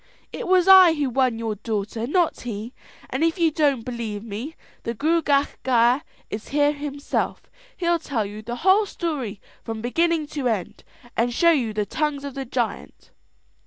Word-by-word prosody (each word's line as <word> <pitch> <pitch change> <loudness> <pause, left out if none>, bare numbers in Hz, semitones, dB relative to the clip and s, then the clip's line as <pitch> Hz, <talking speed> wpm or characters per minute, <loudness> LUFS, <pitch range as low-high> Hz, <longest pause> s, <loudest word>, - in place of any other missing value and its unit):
"It - - -5
was 370 0 +4
I 375 -4 +9
who 285 -4 -1
won 255 -2 +1
your 225 -1 -2
daughter, 220 +2 -3
not 345 +3 +1
he; 230 0 -6 0.4
and 260 +5 0
if 330 +1 +2
you 335 -2 +3
don't 280 -6 +1
believe 225 -4 -4
me, 230 +9 -6 0.3
the 230 - -4
Gruagach 290 +1 +1
Gaire 245 +1 +3 0.3
is 210 +1 -5
here 290 +1 +2
himself. 285 -1 -3 0.3
He'll 345 -1 +1
tell 245 -9 -2
you 205 +2 -7
the 235 +2 -5
whole 400 +2 +5
story 275 - -4 0.2
from 225 -1 -5
beginning 325 +7 +1
to 280 -4 -1
end, 215 -6 -3 0.3
and 235 +2 +1
show 335 +8 +4
you 255 -9 +1
the 210 -1 -1
tongues 300 +2 -2
of 280 -1 -5
the 270 0 -5
giant." 240 -2 -4
265 Hz, 170 wpm, -23 LUFS, 230-315 Hz, 0.4 s, I